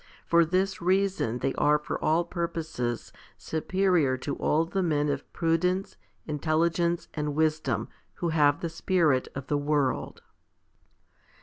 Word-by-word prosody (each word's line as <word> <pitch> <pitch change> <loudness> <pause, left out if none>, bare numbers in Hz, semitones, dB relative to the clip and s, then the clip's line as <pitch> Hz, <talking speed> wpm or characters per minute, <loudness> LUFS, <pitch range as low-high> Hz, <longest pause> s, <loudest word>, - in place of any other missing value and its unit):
For 170 0 +5
this 185 +3 0
reason 185 - +1
they 135 +2 -1
are 150 0 +4
for 150 - -5
all 160 +3 +3
purposes 160 -9 -3 0.2
superior 165 -4 +1
to 140 +2 -4
all 160 +2 +2
the 190 +3 -2
men 150 -4 +1
of 140 -1 -4
prudence, 180 +3 0 0.3
intelligence, 165 +3 0
and 150 -2 -2
wisdom, 155 0 0 0.3
who 170 - -2
have 145 -3 +3
the 170 - -2
spirit 160 -5 +1
of 140 -1 -5
the 145 +1 0
world. 145 -2 -1
160 Hz, 130 wpm, -27 LUFS, 145-170 Hz, 0.3 s, For